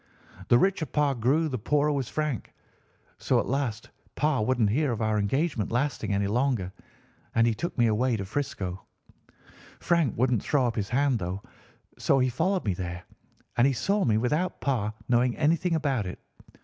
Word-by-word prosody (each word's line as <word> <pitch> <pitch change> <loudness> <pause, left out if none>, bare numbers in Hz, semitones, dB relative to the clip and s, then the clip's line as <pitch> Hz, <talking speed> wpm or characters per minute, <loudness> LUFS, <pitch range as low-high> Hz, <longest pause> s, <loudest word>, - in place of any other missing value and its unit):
The 120 - +6
richer 180 +1 +1
Pa 145 -2 +1
grew 135 +7 +1
the 130 -5 -3
poorer 150 +6 +1
was 140 -3 -2
Frank; 150 -7 -3 0.6
so - - +2
at - - -1
last 125 -5 -2 0.2
Pa 150 -2 +1
wouldn't 110 -2 +2
hear 140 +3 +1
of 115 - -3
our 110 -1 +1
engagement 125 - 0
lasting 125 -1 -1
any 100 0 +1
longer, 110 -4 0 0.6
and 115 - +4
he 115 - +2
took 170 +10 -4
me 120 - +4
away 115 +2 +1
to 100 - -4
'Frisco. 100 -6 -3 1.0
Frank 170 -7 +1
wouldn't 125 -3 +2
throw 140 -4 +1
up 120 -1 -1
his 100 -4 -2
hand, 135 -1 +2
though; 95 +2 -4 0.6
so 140 - +3
he 130 -1 +2
followed 180 +8 0
me 100 - +1
there, 90 -1 -5 0.5
and 120 +2 +5
he 140 - +2
saw 200 - 0
me 110 -3 +2
without 150 +11 0
Pa 115 -7 0 0.2
knowing 120 0 +2
anything 165 +3 +2
about 135 -10 0
it. 90 - -6
125 Hz, 175 wpm, -27 LUFS, 110-145 Hz, 1.0 s, The